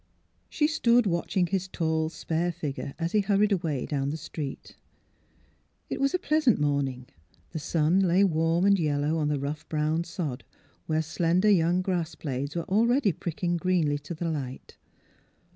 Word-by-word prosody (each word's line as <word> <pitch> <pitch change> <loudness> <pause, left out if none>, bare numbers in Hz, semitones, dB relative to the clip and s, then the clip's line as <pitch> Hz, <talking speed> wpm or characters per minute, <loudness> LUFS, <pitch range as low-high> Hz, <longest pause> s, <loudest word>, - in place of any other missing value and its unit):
She 300 - +1
stood 245 -7 +3
watching 175 0 0
his 190 +1 -2
tall, 160 -3 -1
spare 170 +1 -2
figure 140 -3 -5
as 165 0 -2
he 215 - +3
hurried 205 +1 +2
away 165 -8 -1
down 140 -2 -1
the 155 - -3
street. 150 -3 -7 1.2
It - - -2
was 275 +4 +2
a - - +3
pleasant 305 - +2
morning; 140 -3 0 0.5
the 160 - -4
sun 160 +4 +2
lay 190 0 +4
warm 165 0 +2
and 200 -1 +4
yellow 150 0 0
on 150 - 0
the 150 -1 0
rough 145 +3 -5
brown 155 +1 0
sod, 170 -7 -5 0.4
where 155 0 +1
slender 175 +6 +2
young 175 0 +3
grass 175 -3 -2
blades 140 +1 -4
were 170 - -1
already 230 - +2
pricking 175 +1 -2
greenly 165 -5 +1
to 145 +4 -7
the 170 +2 -3
light. 135 -4 -6
165 Hz, 160 wpm, -27 LUFS, 150-190 Hz, 1.2 s, lay